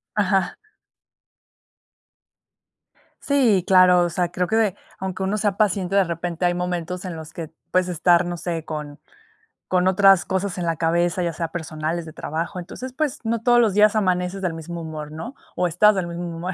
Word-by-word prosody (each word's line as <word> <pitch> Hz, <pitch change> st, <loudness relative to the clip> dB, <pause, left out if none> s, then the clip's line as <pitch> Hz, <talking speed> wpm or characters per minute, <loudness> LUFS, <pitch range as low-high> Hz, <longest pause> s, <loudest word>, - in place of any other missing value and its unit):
Ajá. 195 Hz, -3 st, +1 dB, 2.7 s
Sí, 240 Hz, -10 st, +3 dB
claro. 185 Hz, -2 st, +6 dB
O 175 Hz, -, -1 dB
sea, 175 Hz, -1 st, 0 dB
creo 180 Hz, 0 st, -1 dB
que 220 Hz, -, 0 dB
de 210 Hz, -4 st, +2 dB, 0.2 s
aunque 190 Hz, 0 st, -4 dB
uno 195 Hz, +3 st, 0 dB
sea 205 Hz, -1 st, 0 dB
paciente, 195 Hz, -2 st, +1 dB
de 195 Hz, -, +5 dB
repente 170 Hz, +1 st, -3 dB
hay 175 Hz, 0 st, +3 dB
momentos 180 Hz, 0 st, -3 dB
en 175 Hz, -3 st, -5 dB
los 160 Hz, -1 st, -9 dB
que 165 Hz, -2 st, -7 dB, 0.2 s
puedes 185 Hz, 0 st, +2 dB
estar, 175 Hz, 0 st, +3 dB
no 175 Hz, 0 st, -4 dB
sé, 165 Hz, -1 st, -4 dB
con 150 Hz, -2 st, -6 dB, 0.7 s
con 185 Hz, 0 st, +2 dB
otras 195 Hz, -1 st, +5 dB
cosas 190 Hz, -1 st, -2 dB
en 175 Hz, -, -2 dB
la 165 Hz, -1 st, 0 dB
cabeza, 170 Hz, +2 st, +1 dB
ya 170 Hz, -, -1 dB
sea 165 Hz, +1 st, -3 dB
personales, 160 Hz, 0 st, -4 dB
de 155 Hz, -, -10 dB
trabajo, 165 Hz, +5 st, -4 dB
entonces, 250 Hz, +8 st, -8 dB
pues, 300 Hz, -1 st, -1 dB
no 225 Hz, 0 st, -1 dB
todos 240 Hz, 0 st, +4 dB
los 220 Hz, -5 st, +3 dB
días 210 Hz, +1 st, +4 dB
amaneces 185 Hz, -1 st, 0 dB
del 175 Hz, -3 st, 0 dB
mismo 170 Hz, +1 st, -7 dB
humor, 155 Hz, -2 st, -7 dB
¿no? 195 Hz, -, -7 dB, 0.2 s
O 180 Hz, -, +1 dB
estás 210 Hz, +6 st, +4 dB
del 185 Hz, -2 st, -1 dB
mismo 170 Hz, +1 st, -5 dB
humor. 180 Hz, +2 st, -4 dB
180 Hz, 185 wpm, -22 LUFS, 170-195 Hz, 2.7 s, claro